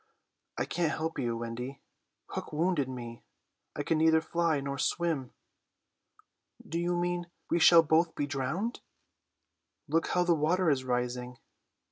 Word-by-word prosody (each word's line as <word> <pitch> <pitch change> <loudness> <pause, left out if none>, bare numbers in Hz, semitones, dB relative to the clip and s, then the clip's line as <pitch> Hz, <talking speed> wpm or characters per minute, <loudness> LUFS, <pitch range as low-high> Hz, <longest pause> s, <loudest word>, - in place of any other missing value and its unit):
"I - - 0
can't 165 -3 0
help 160 +1 -3
you, 120 -2 -1
Wendy. 120 +4 -5 0.5
Hook - - -5
wounded 155 -3 +1
me. 120 -2 -7 0.5
I - - -2
can 160 - +1
neither 160 0 +5
fly 165 -1 0
nor 140 0 -4
swim." 160 -5 0 1.4
"Do 165 - -2
you 175 0 0
mean 175 0 -1 0.2
we 170 - +3
shall 165 0 +8
both 160 +2 +2
be 145 - -1
drowned?" 145 - -2 1.1
"Look 165 +3 +1
how 180 - +2
the 175 -1 +3
water 165 +2 +2
is 130 -2 0
rising." 125 0 -2
155 Hz, 140 wpm, -30 LUFS, 130-170 Hz, 1.4 s, shall